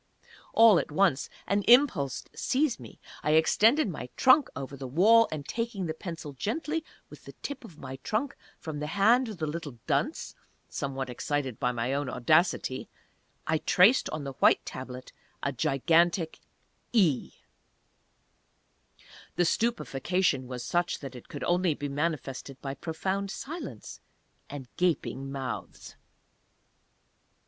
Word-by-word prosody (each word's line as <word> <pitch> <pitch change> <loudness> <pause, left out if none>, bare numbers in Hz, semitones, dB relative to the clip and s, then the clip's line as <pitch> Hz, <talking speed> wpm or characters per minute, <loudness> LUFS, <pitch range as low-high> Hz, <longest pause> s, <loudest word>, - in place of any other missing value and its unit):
All 225 -6 +7
at - - -4
once 155 -4 +2 0.2
an 200 +1 +1
impulse 230 - +4
seized 270 -1 0
me. - - -12 0.2
I 150 - +1
extended 220 - +4
my 150 -8 -6
trunk 265 +2 +5
over 140 0 -6
the 135 -1 -7
wall, 215 - +5
and 150 -3 -5
taking 230 -5 -3
the 160 - -2
pencil 160 -3 -7
gently, 310 - -2 0.3
with - - -13
the - - -10
tip 285 -2 -5
of 180 -9 -13
my 130 -2 -7
trunk, 220 - -2 0.2
from 155 -3 -6
the 150 - -3
hand 225 +8 +3
of 210 - -7
the 160 - -2
little 150 -4 -5
dunce - - -1 0.3
(somewhat 135 -1 -4
excited 130 0 -3
by 125 - +1
my 120 +2 -2
own 140 -1 -1
audacity), 135 0 +1 0.6
I 160 0 +1
traced 195 +12 +4
on 155 -1 -4
the 135 -1 -5
white - - +5
Tablet 130 0 -8 0.3
a 140 - 0
gigantic 160 +6 +2 0.5
"E"!!!! 175 - +2 2.0
The 175 - +2
stupefaction 175 - 0
was 125 -1 -6
such 175 0 0
that 135 -2 -7
it 125 - -12
could - - -6
only 175 -2 +2
be 145 0 -4
manifested 140 -3 -3
by 135 -1 -4
profound 190 +7 -3
silence, 320 - -7 0.5
and 140 -3 -7
gaping 155 -6 -1
mouths. 135 -2 -6
160 Hz, 140 wpm, -28 LUFS, 135-200 Hz, 2.0 s, All